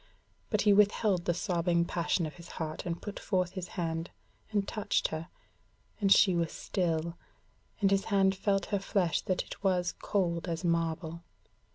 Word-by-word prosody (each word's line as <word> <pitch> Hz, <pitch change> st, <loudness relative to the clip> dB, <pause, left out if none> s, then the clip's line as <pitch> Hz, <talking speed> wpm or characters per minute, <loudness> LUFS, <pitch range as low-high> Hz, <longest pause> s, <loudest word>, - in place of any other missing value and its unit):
But 215 Hz, -, +1 dB
he 205 Hz, -1 st, +5 dB
withheld 205 Hz, -2 st, +3 dB
the 175 Hz, -, +2 dB
sobbing 170 Hz, -2 st, +1 dB
passion 170 Hz, 0 st, 0 dB
of 155 Hz, -, -6 dB
his 170 Hz, 0 st, -11 dB
heart 155 Hz, 0 st, -4 dB
and 170 Hz, 0 st, -2 dB
put 205 Hz, -, -6 dB
forth 185 Hz, -3 st, 0 dB
his 185 Hz, -2 st, -5 dB
hand, 165 Hz, 0 st, -2 dB, 0.4 s
and 205 Hz, -2 st, 0 dB
touched 215 Hz, -2 st, 0 dB
her, 160 Hz, +2 st, -5 dB, 0.7 s
and 200 Hz, -2 st, +2 dB
she 190 Hz, -1 st, +7 dB
was 170 Hz, -2 st, 0 dB
still, 170 Hz, -2 st, -2 dB, 0.6 s
and 195 Hz, -1 st, +4 dB
his 195 Hz, 0 st, +2 dB
hand 195 Hz, -2 st, +3 dB
felt 195 Hz, 0 st, 0 dB
her 200 Hz, -, +3 dB
flesh 190 Hz, -3 st, +1 dB
that 185 Hz, -, -1 dB
it -, -, -10 dB
was 180 Hz, -2 st, +2 dB
cold 175 Hz, -4 st, 0 dB
as 165 Hz, +1 st, -3 dB
marble. 165 Hz, -1 st, -1 dB
180 Hz, 170 wpm, -31 LUFS, 170-195 Hz, 0.7 s, she